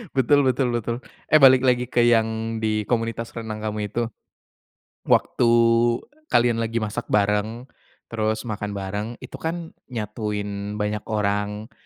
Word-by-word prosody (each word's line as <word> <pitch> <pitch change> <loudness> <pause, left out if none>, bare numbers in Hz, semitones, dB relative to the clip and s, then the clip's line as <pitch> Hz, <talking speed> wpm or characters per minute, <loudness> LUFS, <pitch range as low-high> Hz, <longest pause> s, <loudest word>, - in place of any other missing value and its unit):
Betul 140 +2 +4
betul 130 -2 +1
betul. 120 0 -1 0.3
Eh, 155 - +7
balik 130 -2 +7
lagi 125 -1 +2
ke 120 0 +1
yang 115 -1 +2
di 110 -1 0
komunitas 115 -1 -1
renang 110 -1 -5
kamu 105 -2 -3
itu. 120 - 0 1.0
Waktu 115 -1 +3 0.8
kalian 120 -1 +3
lagi 115 0 -1
masak 105 - -4
bareng, 105 +3 +1 0.5
terus 110 -1 -1
makan 105 -2 -4
bareng, 100 +2 -3 0.2
itu - - -8
kan 165 0 -4 0.2
nyatuin 105 -3 -4
banyak 105 0 -2
orang, 105 +1 -1
110 Hz, 130 wpm, -23 LUFS, 105-120 Hz, 1.0 s, Eh